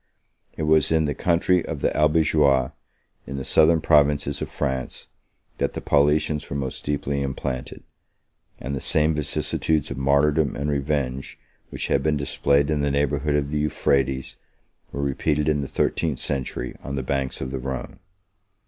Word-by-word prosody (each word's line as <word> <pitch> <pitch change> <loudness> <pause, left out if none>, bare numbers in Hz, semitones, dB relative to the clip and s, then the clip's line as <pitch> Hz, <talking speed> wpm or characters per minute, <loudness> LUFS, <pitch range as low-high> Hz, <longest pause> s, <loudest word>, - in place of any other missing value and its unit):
It - - -2
was 80 +1 +3
in 80 -1 +3
the 75 - -1
country 90 +2 +2
of 75 -4 -5
the - - 0
Albigeois, 75 -4 +3 0.6
30 - - -8
in 70 - -4
the 65 - -5
southern 80 0 +4
provinces 75 -2 +2
of - - -3
France, 65 -3 -4 0.5
that - - 0
the - - -4
Paulicians 75 +1 +1
were - - -4
most 65 -2 -4
deeply 70 -1 -2
implanted; 65 -1 -4 0.8
and 70 +2 -4
the 65 - -4
same 75 +1 +3
vicissitudes 75 0 0
of - - -5
martyrdom 70 +2 +2
and 70 +1 -2
revenge 70 -2 -2 0.3
which - - -4
had 70 - +1
been 75 +1 +1
displayed 70 +1 +1
in 75 -1 0
the 70 - +1
neighborhood 70 +1 0
of 70 -1 -1
the 75 - 0
Euphrates, 70 -3 0 0.5
were 70 - -3
repeated 75 +2 0
in 75 -2 +2
the 70 - -4
thirteenth 80 -1 0
century 65 -2 -3
on 70 - -5
the 65 - -2
banks 65 0 -2
of 65 -1 -4
the 65 - -3
Rhone. 65 -1 -5
70 Hz, 165 wpm, -24 LUFS, 70-75 Hz, 0.8 s, southern